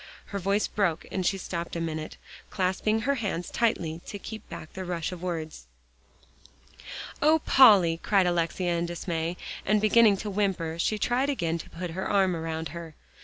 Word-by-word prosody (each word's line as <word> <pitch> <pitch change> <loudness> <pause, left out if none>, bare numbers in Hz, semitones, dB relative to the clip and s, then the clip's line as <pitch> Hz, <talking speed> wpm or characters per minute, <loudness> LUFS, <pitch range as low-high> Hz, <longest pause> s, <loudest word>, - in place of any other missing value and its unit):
Her 200 - -5
voice 200 +3 +1
broke, 175 -6 0
and 190 - -1
she 195 +2 +1
stopped 170 -2 -5
a - - -2
minute, 160 -1 -4 0.3
clasping 195 +3 0
her 275 +5 +1
hands 200 -9 -3
tightly 170 -8 0
to 205 - -5
keep 220 +1 -9
back 155 - -9
the 190 - -5
rush 175 -2 -3
of 180 -2 -7
words. 160 - -5 1.5
"Oh, 310 +2 +5
Polly!" 195 -11 +6
cried 195 -3 +3
Alexia 175 0 0
in 170 - -1
dismay, 170 0 -3 0.3
and 210 +2 +3
beginning 215 -1 +5
to 210 - -4
whimper, 185 -5 -1
she 215 +5 +1
tried 250 +6 +1
again 170 - -1
to - - -9
put 175 0 -6
her 185 +3 -3
arm 190 -3 +3
around 160 -1 -4
her. 165 0 -8
180 Hz, 170 wpm, -27 LUFS, 165-205 Hz, 1.5 s, Polly